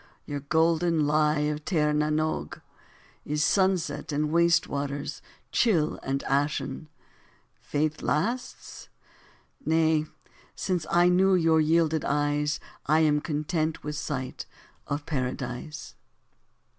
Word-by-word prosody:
your 145 -1 -4
golden 160 +2 +2
lie 150 0 +2
of 150 0 -2
Tir 150 -4 +1
na 150 0 +1
n'Og 155 +1 -1 0.6
Is 150 +1 -1
sunset 185 -1 +1
and 150 +1 0
waste 170 0 +3
waters, 145 +1 -4 0.3
chill 170 -10 +2
and 135 +1 -2
ashen 145 +2 -1 0.7
Faith 150 +1 -2
lasts? 235 +11 -3 0.7
Nay, 160 - +2 0.5
since 180 -4 -2
I 175 +1 +4
knew 190 +1 +4
your 165 -2 +4
yielded 160 0 +2
eyes, 145 +1 0 0.3
I 155 +2 +4
am 150 -1 +3
content 155 0 -2
with 150 0 -4
sight.... 140 -4 -4 0.4
of 145 +1 -3
Paradise. 130 +1 -4
155 Hz, 110 wpm, -27 LUFS, 145-165 Hz, 0.7 s, I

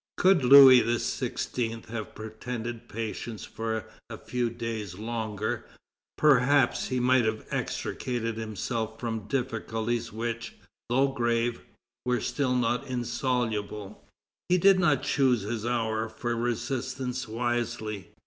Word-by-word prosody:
Could 185 -5 +4
Louis 130 -1 +10
XVI. 115 0 -2
have 110 -2 -6
pretended 115 +2 -6
patience 115 0 -5
for 110 -1 -3 0.2
a - - -6
few 125 -1 -2
days 115 -5 -5
longer, 110 -1 -3 0.5
perhaps 140 -2 +4
he 130 -1 -1
might 125 0 +4
have 110 0 -1
extricated 115 -3 -2
himself 110 +1 -3
from 115 -3 -4
difficulties 115 -2 -2
which, 115 +1 -4 0.3
though 135 +3 +3
grave, 120 -2 0 0.4
were 125 -1 +1
still 125 +2 0
not 120 0 0
insoluble. 120 -5 -2 0.5
He 180 - +5
did 190 +1 +6
not 150 -7 +3
choose 130 -5 +2
his 110 +2 -3
hour 110 -2 0
for 120 +2 -3
resistance 125 +2 -2
wisely. 115 -3 -2
120 Hz, 115 wpm, -28 LUFS, 110-125 Hz, 0.5 s, Louis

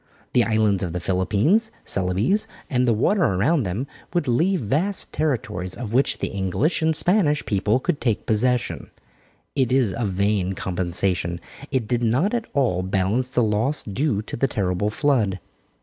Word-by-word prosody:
The 120 - +5
islands 110 -4 +2
of 90 -4 -3
the 90 - -2
Philippines, 100 - +1 0.2
Celebes 100 - +1 0.2
and 125 -1 +2
the 115 - +4
water 195 - +2
around 135 - +2
them 100 +9 -2 0.3
would 175 -5 +1
leave 170 +10 +2
vast 155 - 0
territories 100 - -2
of 115 -3 -6
which 135 +3 +2
the - - -2
English 100 - 0
and 160 0 +2
Spanish 165 -5 +2
people 105 +4 +1
could 160 +2 -2
take 115 -4 0
possession. 120 +3 0 0.7
It 130 -3 +1
is 125 -7 +2
a 120 - -2
vain 100 0 0
compensation. 90 -1 -1 0.3
It 130 -6 -1
did 120 +1 0
not 130 - +1
at 235 -2 -1
all 120 -10 +1
balance 95 +7 0
the 125 -2 +1
loss 110 +7 0
due 105 +1 -1
to - - -6
the 135 - +1
terrible 95 -3 -1
flood. 110 -6 +1
115 Hz, 165 wpm, -23 LUFS, 95-140 Hz, 0.7 s, The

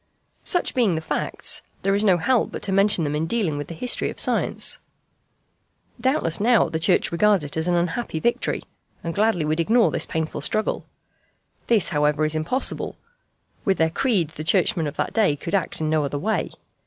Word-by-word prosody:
Such 355 -4 -1
being 230 -9 +2
the - - -1
facts, 160 - 0 0.2
there 195 +1 +2
is 200 +1 +2
no 190 -4 +4
help 240 +8 +1
but - - -7
to 200 - 0
mention 195 -2 +3
them 145 -1 -1
in 160 +2 -1
dealing 190 -6 0
with 145 0 -5
the 165 - -8
history 245 +9 -1
of - - -8
science. - - 0 1.2
Doubtless 260 - 0
now 230 +1 +3
the 160 - -2
Church 180 +2 +2
regards 200 0 +3
it 145 - -5
as 160 +1 0
an 175 - +2
unhappy 175 +1 -1
victory, 235 +7 -1 0.4
and 165 - -3
gladly 205 -5 +1
would 155 +2 -1
ignore 225 +7 +3
this - - 0
painful 160 -2 -3
struggle. 215 +9 -1 0.8
This, 220 -7 +2
however, 150 0 +1
is 155 - +2
impossible. 160 +12 -1 0.7
With 195 -2 +1
their 160 0 +2
creed 190 - +1
the 155 -1 -8
Churchmen 165 -1 +2
of 145 - -6
that - - -2
day 210 -10 +3
could 170 +4 -7
act 195 -4 0
in 155 -1 -1
no 155 -1 +2
other 145 0 -3
way. 215 +9 -1
170 Hz, 190 wpm, -23 LUFS, 155-215 Hz, 1.2 s, no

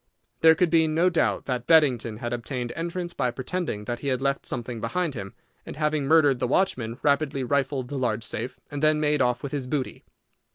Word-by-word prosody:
There 160 0 +7
could 170 0 +1
be 165 -1 +4
no 165 +4 +3
doubt 165 - +1
that 125 -2 -3
Beddington 125 -9 +3
had 120 +1 -4
obtained 120 0 -4
entrance 170 +1 -4
by 125 - 0
pretending 130 - -4
that 120 +2 -3
he 140 - -6
had 130 -2 +1
left 140 0 -1
something 120 -1 -4
behind 165 +7 -1
him, 100 -5 -7 0.3
and - - -8
having 150 -1 0
murdered 145 -4 +4
the - - 0
watchman, 120 -7 0
rapidly 140 -2 +1
rifled 135 -1 -1
the 140 - -3
large 115 -3 -1
safe, 120 +2 -4
and 145 -1 -4
then 155 0 +3
made 150 -1 +1
off 125 -1 +1
with 140 - -4
his 140 -3 -3
booty. 135 -1 -3
140 Hz, 205 wpm, -25 LUFS, 125-155 Hz, 0.3 s, There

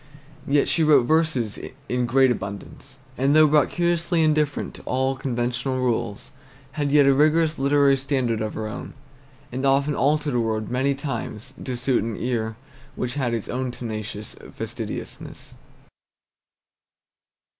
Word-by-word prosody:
Yet 140 0 +3
she 165 - +2
wrote 150 -4 +6
verses 155 -8 +1 0.3
in 125 -1 0
great 130 +1 +4
abundance; 105 +6 -7 0.2
and 135 +3 +3
though 155 0 +7
brought 150 -1 +3
curiously 170 -1 +1
indifferent 150 -2 +1
to - - -10
all 130 +1 0
conventional 125 0 -2
rules, 120 -4 -2 0.4
had 145 0 -1
yet 145 0 +5
a 140 - +5
rigorous 155 +2 +3
literary 140 0 +4
standard 130 -4 -1
of 110 -1 -3
her 110 - -3
own, 105 - -7 0.6
and 130 +2 -4
often 140 +2 +2
altered 145 +2 +1
a 120 - +2
word 110 -1 -1
many 135 +2 +1
times 120 -6 -5
to 125 -2 -4
suit 125 -2 +1
an 115 -1 -4
ear 115 -2 -2 0.4
which 125 0 -3
had 125 -5 -1
its 115 - -4
own 130 +1 -2
tenacious 110 -3 -6 0.2
fastidiousness. - - -7
130 Hz, 145 wpm, -24 LUFS, 120-145 Hz, 0.6 s, though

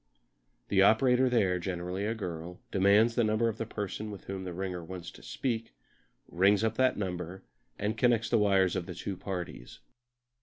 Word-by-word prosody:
The 95 -1 +4
operator 125 +5 +5
there, 95 -7 +2
generally 90 +2 -3
a 115 - -1
girl, 90 -4 -6
demands 100 +4 +4
the 120 - +2
number 110 +2 +2
of 110 - -6
the 115 - -3
person 105 0 -4
with 100 -3 -8
whom 95 -1 -5
the 90 - -4
ringer 90 -1 -4
wants 90 0 -7
to - - -15
speak, 110 - -3 0.5
rings 100 +4 +3
up 110 0 +1
that 130 0 +3
number, 90 -2 -4 0.3
and 105 +2 -1
connects 115 -1 +2
the 115 - +3
wires 95 -3 +3
of 90 -2 -3
the 90 - -6
two 95 +3 -4
parties. 90 -1 -6
100 Hz, 180 wpm, -30 LUFS, 90-110 Hz, 0.5 s, operator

